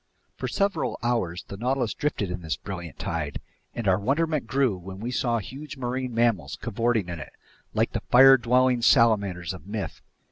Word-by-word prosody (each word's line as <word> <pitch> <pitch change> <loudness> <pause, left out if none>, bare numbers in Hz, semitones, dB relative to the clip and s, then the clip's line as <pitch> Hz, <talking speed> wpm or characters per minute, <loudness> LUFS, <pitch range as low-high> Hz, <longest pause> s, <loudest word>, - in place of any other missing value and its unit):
For - - -4
several 200 -5 0
hours 115 -8 -1
the 100 - -7
Nautilus 125 +1 0
drifted 125 -11 -2
in 90 0 -4
this 80 -1 -2
brilliant 85 -6 -7
tide, 75 -3 -3 0.4
and 115 -3 -3
our 95 0 +4
wonderment 145 +4 0
grew 130 -4 +2
when 95 +1 -9
we 120 +4 -4
saw 120 -1 +1
huge 135 +7 -7
marine 125 -1 -3
animals 105 -12 +1
cavorting 115 -3 0
in 85 -2 -5
it, - - -9 0.4
like - - +2
the - - -3
fire 135 +2 +9
dwelling 125 0 +2
salamanders 100 -8 +3
of 90 +1 -11
myth. 105 -1 -5
115 Hz, 175 wpm, -26 LUFS, 95-130 Hz, 0.4 s, fire